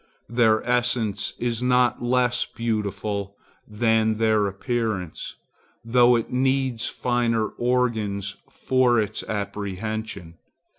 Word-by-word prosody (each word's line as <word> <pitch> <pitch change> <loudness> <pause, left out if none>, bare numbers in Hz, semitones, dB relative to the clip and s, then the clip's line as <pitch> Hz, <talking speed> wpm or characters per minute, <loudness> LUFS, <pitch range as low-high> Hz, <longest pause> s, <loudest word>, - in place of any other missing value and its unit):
Their 115 -2 +3
essence 120 -5 0
is 120 -1 -2
not 125 -1 +2
less 125 0 +2
beautiful 100 -3 -3 0.3
than 110 0 +2
their 110 -2 +2
appearance, 100 -4 -3 0.5
though 120 +1 +5
it 115 - -2
needs 130 -2 +1
finer 120 -3 0
organs 110 -6 -1
for 125 -2 +2
its 105 0 -2
apprehension. 100 -3 -5
115 Hz, 95 wpm, -24 LUFS, 105-120 Hz, 0.5 s, though